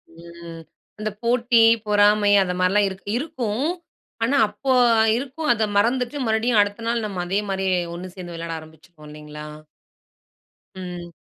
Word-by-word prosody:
ம். 170 0 -11 0.4
அந்த 215 0 -2
போட்டி, 235 0 +3 0.2
பொறாமை 205 0 +4
அந்த 180 -1 -3
மாரிலாம் 195 +3 +3
இருக் 190 +1 -11
இருக்கும். 255 -4 -3 0.6
ஆனா 250 +5 +1
அப்போ 210 +6 -3 0.5
இருக்கும் 280 +5 -4
அத 220 -1 -1
மறந்துட்டு 245 +6 +1
மறுபடியும் 220 +1 +2
அடுத்த 205 +2 -2
நாள் 230 -1 0
நம்ம 195 -4 -4
அதே 190 +3 0
மாரியே 190 -1 0 0.2
ஒண்ணு 175 +2 -7
சேர்ந்து 175 -2 -8
விளையாட 165 0 -5
ஆரம்பிச்சுருவோம் 155 0 -16
இல்லைங்களா? 150 0 -10 1.4
ம். 175 -1 -7
205 Hz, 135 wpm, -22 LUFS, 175-235 Hz, 1.4 s, பொறாமை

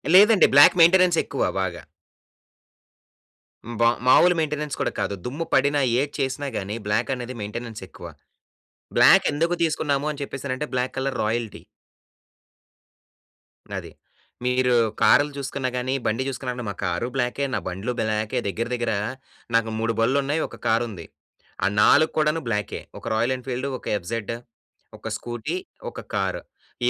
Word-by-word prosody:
లేదండి. 210 +1 +7
Black 145 - +8
maintenance 175 0 +6
ఎక్కువ 140 - -2 0.2
బాగా. 90 -2 -3 1.8
హ్మ్. 120 0 -7
బా 115 - +5 0.2
మామూలు 175 +7 +6
మెయింటెనెన్స్ 150 -2 -2
కూడా - - 0
కాదు. 100 0 -1
దుమ్ము 145 +7 -3
పడినా 140 +2 +3 0.2
ఏది 145 +1 -2
చేసినా 135 +1 -2
గాని 100 +2 -4
బ్లాకనేది 120 +4 -1
మెయింటెనెన్స్ 110 +2 -6
ఎక్కువ. - - -11 0.9
బ్లాకెందుకు 165 +4 +5
తీసుకున్నాము 150 -3 0
అని 145 - -10
చెప్పేసనంటే 135 +1 -4
బ్లాక్ 125 0 -1
కలర్ 135 0 -2
రాయల్టీ. 115 0 -3 2.2
అది. - - -7 0.5
మీరు 125 0 +2 0.3
కారులు 145 +2 +5
చూసుకున్నా 135 -1 -3
కానీ, 125 +1 -1
బండి 115 +4 0
చూసుకున్నా 130 -1 -3
అంటే 125 -1 -6
మా 100 - -5
కారు 90 +6 -1
బ్లాకే, 130 +2 0
నా - - +1
బండ్లు 95 +6 -3
బ్లాకే. 110 +2 -1
దగ్గర 110 +5 -2
దగ్గర 120 -1 -1 0.6
నాకు 115 -1 +2
3 115 0 0
బళ్ళున్నాయి. 140 +6 +1
ఒక - - -13
కారుంది. 110 -6 0 0.6
ఆ - - +4
4 155 +8 +5
కూడాను 155 +1 +2
బ్లాకే. 105 -3 -2 0.2
ఒక - - -16
రాయల్ 115 +4 +1
ఎన్ఫీల్డూ, 130 +1 -4
ఒక - - -12
ఎఫ్‌జెడ్, 110 +4 -4 0.7
ఒక - - -8
స్కూటీ, 120 +8 -4 0.3
ఒక - - -8
కారు. - - -1 0.5
ఈ - - +5
125 Hz, 135 wpm, -24 LUFS, 115-145 Hz, 2.2 s, బ్లాక్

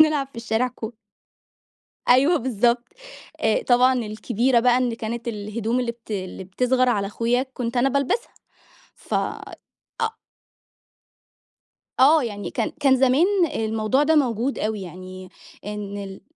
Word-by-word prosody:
بنلعب 305 -3 +4
في 275 - -20
الشارع 230 +2 0
كو 235 -2 -7 1.2
أيوه 275 +7 +5
بالضبط. 240 -1 +1 0.6
آآ، - - +2
طبعًا 250 +1 +4
الكبيرة 235 +1 0
بقى 245 +1 +4
إن 250 -2 0
كانت 230 +1 -5
الهدوم 220 +2 -2
اللي 245 -2 -1
بت 230 -1 -15
اللي 190 -2 -4
بتصغر 250 +7 +1
على 200 -4 0
أخويا 235 +4 0
كنت 240 0 -3
أنا 255 +3 +3
بالبسها، 280 - -1 0.6
ف - - -6
أ 450 -2 -5 1.9
آه، 295 +3 +6
يعني 205 -6 -5
كان - - -1
كان 270 -2 +4
زمان 265 +5 +4 0.3
الموضوع 220 +5 +1
ده 315 +2 +3
موجود 255 -2 +1
أوي، 215 -1 -2
يعني 185 +1 -9 0.4
إن 205 -1 -5
ال 195 -1 -8
235 Hz, 130 wpm, -23 LUFS, 215-260 Hz, 1.9 s, آه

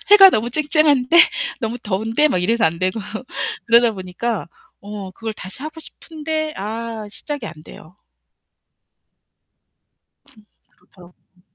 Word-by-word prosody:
해가 390 -2 +10
너무 230 +3 0
쨍쨍한데? 295 0 +3 0.4
너무 230 +2 -3
더운데?' 225 +8 +1
막 - - 0
이래서 230 +3 +2
안 165 +1 -2
되고. 185 +4 -1 0.7
그러다 235 0 +5
보니까 190 +2 -4 0.4
어 200 -2 -7
그걸 225 +1 -5
다시 195 +7 -8
하고 315 +1 -7
싶은데 310 -1 -5
아 220 +1 -5
시작이 285 +1 -6
안 170 - -8
돼요. 170 +5 -14 2.3
궁 220 -5 -22 0.3
그렇죠. 180 -1 -19 0.2
음. 180 - -28
230 Hz, 250 characters per minute, -20 LUFS, 200-295 Hz, 2.3 s, 해가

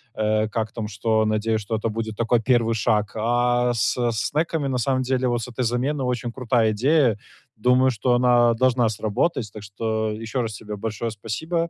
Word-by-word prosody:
э, 110 0 +1
как 110 0 -2
там 110 -2 -5
что. 110 +1 0
Надеюсь, 110 +1 0
что 110 +2 -3
это 110 +1 -2
будет 110 0 -4
такой 115 +1 +2
1 115 -1 +2
шаг. 105 0 +1
А 120 +2 +1
со 120 +2 0
снеками, 145 +7 -1
на 130 -2 -1
самом 130 +1 0
деле, 130 0 0
вот 120 -1 0
с - - -5
этой 125 +1 -3
замены 130 +4 -1
очень 125 -1 -2
крутая 120 -3 +1
идея. 125 0 +2 0.4
Думаю, 125 +4 +3
что 120 +2 0
она 120 -1 +4
должна 125 -2 +2
сработать. 110 +3 -1
Так 105 -1 -9
что 110 +2 -2
ещё 115 +3 -3
раз 110 -2 -4
тебе 105 -1 -7
большое 110 +2 -4
спасибо. 160 - -3
115 Hz, 185 wpm, -23 LUFS, 110-125 Hz, 0.4 s, она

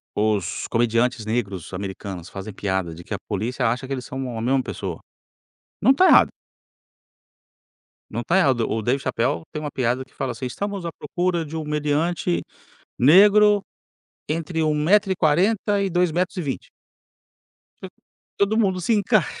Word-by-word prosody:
os 105 -3 0
comediantes 115 0 +1
negros 100 -6 -3
americanos 95 -2 -6
fazem 100 +1 -7
piada 95 -4 -2
de 85 +1 -11
que - - -7
a 100 - -1
polícia 115 +4 -1
acha 125 +3 -2
que 135 - -3
eles 125 -2 -5
são 130 -3 -5
a - - -3
mesma 130 +3 +2
pessoa, 95 -8 -5 0.8
não 250 - +6
tá 370 +7 +4
errado. - - +7 1.8
Não 115 - -3
está 170 +9 +2
errado. 130 -10 +2
O 110 - -1
David 130 +5 0
Chapel 130 +4 -1
tem 150 - -4
uma 150 -1 -4
piada 125 0 -1
que 130 - -29
fala, 130 -2 -3
assim: 125 +2 -5
"Estamos 200 +5 -4
à 165 - -4
procura 175 +2 -2
de 160 +1 -7
um 155 - -3
meliante 150 - 0 0.6
negro 205 - +6 0.7
entre 160 +1 -1
1 155 -1 +2
metro 190 +6 +3
e - - +1
40 195 +5 +2
2 175 -1 +2
metros 180 +3 -1
e - - -1
20". 140 -5 -5 1.1
To - - -6 0.5
todo 205 +3 +2
mundo 190 -4 +1
se 225 - 0
encaixa. 205 -3 +1
140 Hz, 165 wpm, -23 LUFS, 115-180 Hz, 1.8 s, errado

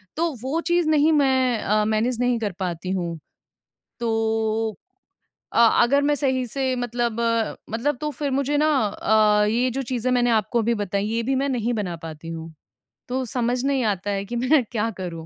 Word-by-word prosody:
तो 335 +1 0
वो 270 +6 -1
चीज़ 345 -2 +2
नहीं 310 +1 +4
मैं 260 -4 +3
अ, 210 +1 +2
मैनेज 225 +3 0
नहीं 245 -1 +1
कर 210 -3 -2
पाती 180 -1 -3
हूँ। 175 -3 -2 0.8
तो 225 -1 0 0.8
अ, - - 0 0.2
अगर 280 +4 +3
मैं 295 +1 +2
सही 260 -3 0
से 260 +2 -1
मतलब, 240 -1 -2 0.5
मतलब 245 +6 -1
तो 300 0 -2
फिर 290 -1 -3
मुझे 280 +2 0
ना 305 +1 +3 0.2
अ, 210 0 +3
ये 240 +4 +1
जो 270 +3 -3
चीज़ें 255 0 -2
मैंने 245 -1 +2
आपको 220 +1 +1
अभी 235 +2 +1
बताई, 200 +1 -2
ये 230 +2 -1
भी 265 +4 0
मैं 275 +1 0
नहीं 245 -2 -1
बना 185 -6 -3
पाती 160 +1 -9
हूँ 165 0 -7 0.6
तो 260 +1 -1
समझ 245 +1 -1
नहीं 275 -2 +1
आता 205 -1 -1
है 195 0 -2
कि 240 +4 -6
मैं 255 +3 +3
क्या 225 -1 0
करूँ? 170 -4 -6
235 Hz, 185 wpm, -23 LUFS, 210-265 Hz, 0.8 s, नहीं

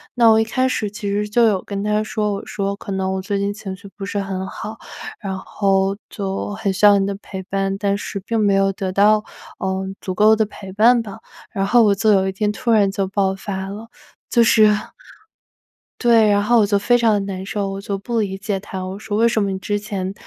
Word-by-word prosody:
那 235 -1 +5
我 220 0 +5
一 - - +3
开 255 +4 0
始 215 -5 -1
其 210 +1 -6
实 210 +1 -1
就 235 +3 +3
有 200 -4 +2
跟 200 -1 -4
他 210 0 +1
说， 210 -1 -1
我 200 - -5
说 200 -1 -2
可 200 - -8
能 190 0 -1
我 190 - -2
最 200 +1 -2
近 200 +1 -1
情 200 -3 -7
绪 200 +1 -13
不 200 - -8
是 205 - -3
很 190 -1 -4
好， 220 +2 -7 0.4
然 190 -3 -4
后 195 0 0
就 195 -2 -4
很 200 -2 -1
需 190 - -6
要 205 -1 +7
你 195 - +1
的 200 - -2
陪 190 -1 -7
伴， 195 0 -2
但 200 0 0
是 200 0 -5
并 225 +3 -2
没 205 -2 +3
有 195 0 +3
得 190 -1 -3
到， 210 +2 +4 0.4
嗯， 190 0 -2
足 185 -1 -4
够 215 +2 +5
的 220 0 +1
陪 195 -2 -10
伴 235 +4 +5
吧。 200 -3 -9 0.3
然 195 - -2
后 240 +2 +5
我 205 -2 +4
就 215 +2 +2
有 190 -2 +3
一 190 - -1
天 205 +2 -1
突 235 +3 -2
然 210 -3 +4
就 195 -1 -1
爆 195 -1 0
发 190 -1 -5
了。 215 +3 -8 0.4
就 235 - +5
是 220 -2 +5 1.3
对， 230 -3 +4
然 205 0 +3
后 235 +2 +4
我 210 - +4
就 200 0 +2
非 245 +5 +2
常 230 -2 +3
地 205 - +2
难 195 -1 -5
受， 200 0 -2
我 195 0 -5
就 200 0 -3
不 230 +4 -2
理 195 -3 -2
解 195 0 -3
他。 190 -2 -6
我 190 +2 -6
说 210 -1 -3
为 230 +1 +4
什 230 -2 +1
么 200 - -1
你 190 - -3
之 205 +2 -2
前， 195 -3 -4
200 Hz, 260 characters per minute, -20 LUFS, 195-215 Hz, 1.3 s, 要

